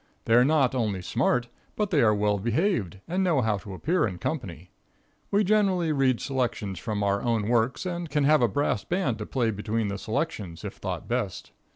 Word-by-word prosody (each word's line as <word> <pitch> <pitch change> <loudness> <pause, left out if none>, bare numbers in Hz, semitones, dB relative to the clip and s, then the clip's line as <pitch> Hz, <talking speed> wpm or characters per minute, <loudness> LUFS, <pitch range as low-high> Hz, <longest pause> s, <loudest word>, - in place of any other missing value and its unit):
They 115 - +2
are 120 +1 +7
not 140 -2 +3
only 105 -7 -1
smart, 120 +4 +1 0.3
but 210 -2 -1
they 150 -5 +4
are 110 -2 +4
well 105 0 +1
behaved 115 - 0
and 185 +3 0
know 165 -7 +2
how 110 -3 0
to 95 0 -8
appear 165 - +1
in 90 -3 -6
company. 90 - -5 0.6
We 205 +1 +3
generally 190 -5 +2
read 135 -4 +2
selections 120 -7 -2
from 105 -3 -2
our 100 0 +1
own 115 -3 0
works, 120 +6 +1
and 175 -2 -3
can 150 0 +1
have 150 +1 +5
a 120 - +5
brass 110 -2 0
band 150 - -1
to 105 - -5
play 120 -4 0
between 105 +1 -2
the 100 0 -4
selections, 110 - -3
if - - -5
thought - - -5
best. 120 -7 -3
120 Hz, 200 wpm, -26 LUFS, 105-155 Hz, 0.6 s, are